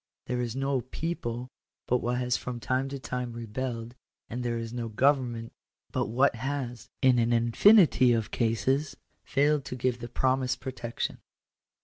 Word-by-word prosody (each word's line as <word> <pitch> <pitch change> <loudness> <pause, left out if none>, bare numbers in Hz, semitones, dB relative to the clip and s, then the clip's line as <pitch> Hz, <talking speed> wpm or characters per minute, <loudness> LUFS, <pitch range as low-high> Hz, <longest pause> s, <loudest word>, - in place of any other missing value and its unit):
There 125 0 -1
is 120 -1 -3
no 135 -1 0
people 125 -3 -4 0.4
but 125 - +2
what 120 +1 -1
has 125 0 +1
from 125 -1 -4
time 130 +3 0
to 140 - -4
time 125 -2 -4
rebelled; 115 +1 -4 0.4
and 120 +3 -3
there 120 -1 -1
is 115 0 -5
no 120 -1 -3
government 120 -1 +1 0.4
but - - 0
what 125 +2 +2
has, 125 -2 -4
in 130 -2 +5
an 115 0 +2
infinity 125 - +6
of 115 -2 0
cases, 130 +6 0 0.3
failed 145 0 +2
to 125 - -5
give 125 0 0
the 120 0 -7
promised 130 +1 +1
protec 125 -3 -6
tion. - - -1
125 Hz, 160 wpm, -28 LUFS, 120-130 Hz, 0.4 s, infinity